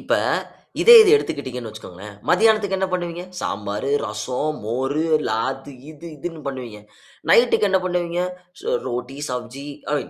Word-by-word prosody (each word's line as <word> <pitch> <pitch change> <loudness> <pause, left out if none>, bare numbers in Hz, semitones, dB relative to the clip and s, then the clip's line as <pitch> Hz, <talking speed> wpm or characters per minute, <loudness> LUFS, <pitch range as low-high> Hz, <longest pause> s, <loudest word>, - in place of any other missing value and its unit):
இப்ப, - - 0 0.7
இதே 475 - +9
இது 410 - +4
எடுத்துகிட்டீங்கன்னு 125 - -4
வச்சிக்கோங்களேன். 105 -1 -11
மதியானத்துக்கு 215 -3 +3
என்ன 190 - +1
பண்ணுவீங்க? 175 -1 -3 0.2
சாம்பாரு, 105 - -3 0.2
ரசம், 130 +8 -3
மோரு, 135 +7 -1 0.2
அது 135 +5 -2 0.2
இது 155 +2 -12
இதுன்னு 165 +2 -6
பண்ணுவீங்க. 120 -6 -7 0.5
நைட்‌க்கு 235 -3 +5
என்ன 190 - +4
பண்ணுவீங்க? 175 -1 -1 0.4
ஸ் - - -14 0.2
ரோட்டி, 125 +2 -4
சப்ஜி 125 +3 -6 0.3
ஐ - - +2
135 Hz, 130 wpm, -22 LUFS, 120-175 Hz, 0.7 s, இதே